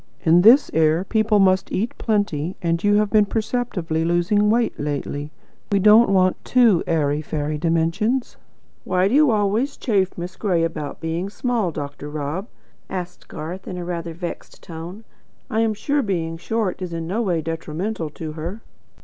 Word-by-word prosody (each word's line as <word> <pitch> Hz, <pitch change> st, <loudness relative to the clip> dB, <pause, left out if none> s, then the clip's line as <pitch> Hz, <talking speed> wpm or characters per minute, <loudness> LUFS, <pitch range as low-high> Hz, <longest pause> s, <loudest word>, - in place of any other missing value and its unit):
In 170 Hz, +2 st, +5 dB
this 240 Hz, +9 st, +6 dB
air 160 Hz, +2 st, +3 dB
people 215 Hz, +1 st, +2 dB
must 190 Hz, -1 st, +3 dB
eat 220 Hz, +5 st, -2 dB
plenty, 190 Hz, -7 st, -1 dB
and 170 Hz, -2 st, -1 dB
you 205 Hz, 0 st, +4 dB
have 210 Hz, 0 st, +2 dB
been 210 Hz, -2 st, +4 dB
perceptibly 210 Hz, -8 st, -2 dB
losing 175 Hz, +5 st, +2 dB
weight 230 Hz, +2 st, +2 dB
lately. 145 Hz, 0 st, -3 dB, 0.4 s
We 200 Hz, -, +3 dB
don't 215 Hz, +4 st, +6 dB
want 185 Hz, -1 st, +2 dB
TOO 235 Hz, -9 st, +4 dB
airy 150 Hz, -3 st, +1 dB
fairy 150 Hz, 0 st, -3 dB
dimensions." 170 Hz, -, 0 dB, 0.5 s
"Why 185 Hz, +1 st, +2 dB
do 205 Hz, -, -1 dB
you 295 Hz, 0 st, +5 dB
always 215 Hz, +5 st, +1 dB
chaff 195 Hz, -6 st, 0 dB
Miss 180 Hz, +2 st, -6 dB
Gray 180 Hz, -6 st, +1 dB
about 155 Hz, -4 st, -4 dB
being 165 Hz, +4 st, -2 dB
small, 230 Hz, -2 st, -1 dB
Dr. 145 Hz, -1 st, -6 dB
Rob?" 150 Hz, +7 st, -4 dB, 0.4 s
asked 180 Hz, -1 st, -6 dB
Garth, 175 Hz, +5 st, -7 dB
in 180 Hz, -, -5 dB
a 175 Hz, -, -5 dB
rather 170 Hz, -2 st, -4 dB
vexed 175 Hz, 0 st, -7 dB
tone. 170 Hz, +6 st, -8 dB, 0.5 s
"I 220 Hz, -, +1 dB
am 225 Hz, -1 st, +1 dB
sure 285 Hz, +7 st, 0 dB
being 170 Hz, -7 st, -2 dB
short 195 Hz, +2 st, -2 dB
is 180 Hz, -2 st, -4 dB
in 165 Hz, -1 st, -4 dB
no 195 Hz, +8 st, -1 dB
way 180 Hz, -7 st, 0 dB
detrimental 165 Hz, +3 st, -4 dB
to 155 Hz, +1 st, -7 dB
her." 170 Hz, +8 st, -6 dB
180 Hz, 165 wpm, -22 LUFS, 165-215 Hz, 0.5 s, this